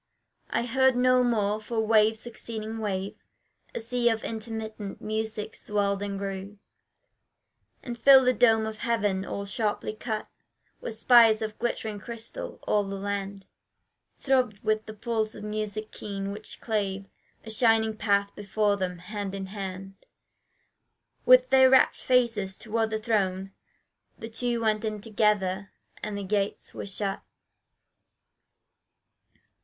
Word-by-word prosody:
I 235 Hz, -, 0 dB
heard 260 Hz, +1 st, +3 dB
no 255 Hz, 0 st, +4 dB
more 215 Hz, -3 st, +1 dB
for 225 Hz, +1 st, -3 dB
wave 220 Hz, 0 st, +4 dB
succeeding 225 Hz, -1 st, -6 dB
wave 200 Hz, 0 st, -3 dB, 0.5 s
A -, -, -1 dB
sea 240 Hz, +1 st, +1 dB
of 225 Hz, -1 st, -1 dB
intermittent 220 Hz, -2 st, -5 dB
music 215 Hz, 0 st, -3 dB
swelled 200 Hz, -1 st, -1 dB
and 200 Hz, -1 st, -3 dB
grew, 195 Hz, +1 st, -5 dB, 1.3 s
And 240 Hz, -2 st, -6 dB
filled 265 Hz, +1 st, +8 dB
the 255 Hz, -, +4 dB
dome 225 Hz, -3 st, +4 dB
of 220 Hz, 0 st, -6 dB
heaven, 205 Hz, -5 st, 0 dB
all 200 Hz, +1 st, -4 dB
sharply 210 Hz, +1 st, -2 dB
cut 215 Hz, 0 st, -4 dB, 0.5 s
With 225 Hz, -, -6 dB
spires 225 Hz, -2 st, +6 dB
of 215 Hz, -1 st, -5 dB
glittering 220 Hz, -3 st, -2 dB
crystal: 235 Hz, -, -6 dB
all 210 Hz, -1 st, +2 dB
the 195 Hz, 0 st, -5 dB
land 200 Hz, 0 st, -4 dB, 0.7 s
Throbbed 255 Hz, -6 st, +1 dB
with 215 Hz, 0 st, 0 dB
the 215 Hz, -, -8 dB
pulse 220 Hz, 0 st, -2 dB
of 210 Hz, -, -9 dB
music 215 Hz, 0 st, -4 dB
keen, 200 Hz, -1 st, -5 dB
which 210 Hz, +2 st, -7 dB
clave 200 Hz, -3 st, -2 dB, 0.4 s
A 220 Hz, -, -5 dB
shining 220 Hz, -1 st, +3 dB
path 200 Hz, -1 st, +1 dB
before 205 Hz, 0 st, 0 dB
them: 180 Hz, -2 st, -3 dB
hand 200 Hz, +2 st, -5 dB
in 195 Hz, -1 st, -4 dB
hand 195 Hz, -1 st, -6 dB, 1.3 s
With -, -, +7 dB
their 260 Hz, -1 st, +7 dB
rapt 265 Hz, 0 st, +5 dB
faces 230 Hz, -7 st, +1 dB
toward 225 Hz, 0 st, -1 dB
the 220 Hz, -, -1 dB
throne 195 Hz, -4 st, -1 dB, 0.7 s
the 225 Hz, -, -7 dB
two 235 Hz, +1 st, -1 dB
Went 215 Hz, -1 st, +1 dB
in 215 Hz, -1 st, -2 dB
together 205 Hz, -3 st, 0 dB, 0.3 s
and 210 Hz, -1 st, -4 dB
the 200 Hz, -, -4 dB
gates 200 Hz, +1 st, -2 dB
were -, -, -6 dB
shut. 195 Hz, 0 st, -3 dB
215 Hz, 135 wpm, -27 LUFS, 200-225 Hz, 1.3 s, filled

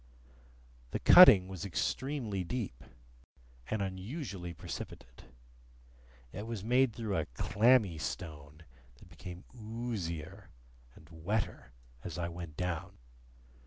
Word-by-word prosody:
The -, -, -3 dB
cutting 100 Hz, -, +9 dB
was 95 Hz, -2 st, -7 dB
extremely 110 Hz, -, -2 dB
deep, 95 Hz, -, -4 dB, 0.9 s
and 110 Hz, -2 st, 0 dB
unusually 95 Hz, -, -5 dB
precipitate. 65 Hz, -6 st, -8 dB, 1.1 s
It 105 Hz, +3 st, -6 dB
was 115 Hz, -4 st, -5 dB
made 125 Hz, +2 st, +3 dB
through 110 Hz, -3 st, -3 dB
a -, -, -1 dB
clammy 105 Hz, -, +3 dB
stone, 75 Hz, -3 st, -6 dB, 0.3 s
that -, -, -18 dB
became 90 Hz, 0 st, -9 dB
oozier 110 Hz, -8 st, -5 dB, 0.5 s
and 80 Hz, -, -17 dB
wetter 85 Hz, -, -3 dB, 0.3 s
as -, -, -6 dB
I 85 Hz, 0 st, -2 dB
went 85 Hz, -3 st, -8 dB
down. 90 Hz, -3 st, -3 dB
95 Hz, 105 wpm, -32 LUFS, 85-115 Hz, 1.1 s, cutting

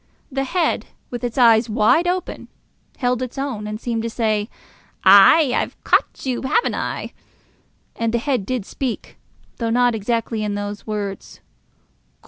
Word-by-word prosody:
The 270 Hz, 0 st, -1 dB
head, 340 Hz, +4 st, 0 dB, 0.2 s
with 245 Hz, 0 st, -5 dB
its 240 Hz, 0 st, -3 dB
eyes 230 Hz, -2 st, +5 dB
wide 220 Hz, +11 st, +3 dB
open, 365 Hz, 0 st, -3 dB, 0.5 s
held 250 Hz, -1 st, 0 dB
its 255 Hz, +1 st, -5 dB
own, 255 Hz, -7 st, -3 dB
and 215 Hz, 0 st, -5 dB
seemed 230 Hz, -2 st, -2 dB
to 230 Hz, -, -3 dB
say, 215 Hz, -2 st, -1 dB, 0.6 s
"Ay, 200 Hz, +9 st, +7 dB
I've -, -, -2 dB
caught -, -, +1 dB
you, 255 Hz, -2 st, -1 dB
have 440 Hz, -, +1 dB
I?" -, -, -4 dB, 0.8 s
And 230 Hz, -1 st, -1 dB
the 235 Hz, -, +1 dB
head 250 Hz, -3 st, -1 dB
did 240 Hz, 0 st, -3 dB
speak, 255 Hz, 0 st, -5 dB, 0.4 s
though 230 Hz, -1 st, -2 dB
not 245 Hz, +1 st, +3 dB
exactly 225 Hz, 0 st, -2 dB
in 205 Hz, -1 st, -2 dB
those 205 Hz, +1 st, -5 dB
words. 205 Hz, -2 st, -5 dB
235 Hz, 150 wpm, -21 LUFS, 215-255 Hz, 0.8 s, Ay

